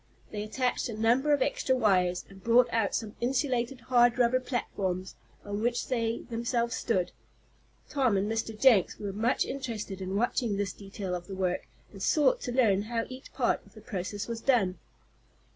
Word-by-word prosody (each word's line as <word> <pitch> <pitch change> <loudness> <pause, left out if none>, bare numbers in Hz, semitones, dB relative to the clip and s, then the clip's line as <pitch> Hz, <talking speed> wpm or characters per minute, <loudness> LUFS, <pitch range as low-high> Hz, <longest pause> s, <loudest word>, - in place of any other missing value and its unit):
They 210 - -4
attached 250 +4 -1
a 220 - -5
number 245 +6 +3
of 285 -2 +4
extra 260 - +1
wires, 185 -7 +2
and 195 -1 -15
brought 240 +1 +5
out 225 -3 +1
some 215 -2 -3
insulated, 250 -1 0
hard 240 0 +4
rubber 250 +1 +3
platforms, 190 -7 -3 0.3
on 205 +1 -3
which 240 +1 0
they 230 -2 -1
themselves 235 +1 0
stood. 185 -6 0 0.8
Tom 255 -8 +2
and 195 +2 0
Mr. 225 0 -3
Jenks 230 -8 +5
were 200 -2 -4
much 225 +5 +1
interested 220 -8 -5
in 190 +1 -3
watching 230 -1 0
this 200 -2 -1
detail 195 -2 -6
of 175 0 -4
the 195 - -6
work, 185 -1 -1 0.2
and 195 - -11
sought 325 - +3
to 250 - -3
learn 225 -6 +3
how 230 +2 -2
each 255 0 -10
part - - +1
of - - -22
the 215 - -12
process 200 -2 -4
was 230 -1 -4
done. 205 -9 +2
225 Hz, 175 wpm, -29 LUFS, 200-245 Hz, 0.8 s, brought